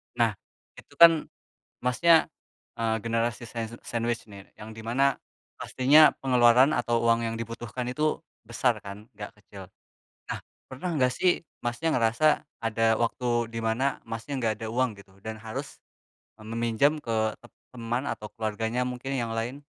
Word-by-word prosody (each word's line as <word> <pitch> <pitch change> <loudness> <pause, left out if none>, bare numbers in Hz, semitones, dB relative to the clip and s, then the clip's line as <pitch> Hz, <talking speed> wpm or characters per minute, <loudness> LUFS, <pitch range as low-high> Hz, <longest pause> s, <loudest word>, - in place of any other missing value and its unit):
Nah, - - +3 0.5
itu - - -18
kan 165 -2 +7 0.5
Masnya, 160 +7 +4 0.5
eee, 115 -1 0
generasi 115 +1 -1
sand 115 0 -6
sandwich 120 -1 -2
nih 100 -1 -13
yang 110 +1 -9
di 110 - -8
mana 135 +5 +2 0.4
pastinya 150 +4 +5
pengeluaran 125 +2 +5
atau 120 0 +1
uang 115 0 +3
yang 115 - -3
dibutuhkan 120 +1 -5
itu, 150 +4 0 0.3
besar 115 0 0
kan, 100 +2 -9
enggak - - -7
kecil. - - -12 0.6
Nah, - - -2 0.3
pernah 135 +8 -4
enggak 130 -4 +3
sih 180 -2 +1 0.2
Masnya, 120 +7 -1
ngerasa 115 +5 +2 0.4
ada 115 0 +2
waktu 120 0 0
di 115 - -4
mana 115 +5 0
Masnya, 115 +5 -4
enggak 115 -3 +1
ada - - -3
uang 125 0 +1
gitu 100 -1 -16
dan 110 +1 -6
harus 110 0 -6 0.6
e 110 - -14
meminjam 115 +6 +1
ke 115 - -2 0.3
tem 120 - -17 0.2
teman 120 +2 -2
atau 105 - -5
keluarganya 115 +2 -2
mungkin, 125 +1 -5
yang 115 -1 -2
lain? 125 +6 -4
120 Hz, 150 wpm, -27 LUFS, 115-130 Hz, 0.6 s, kan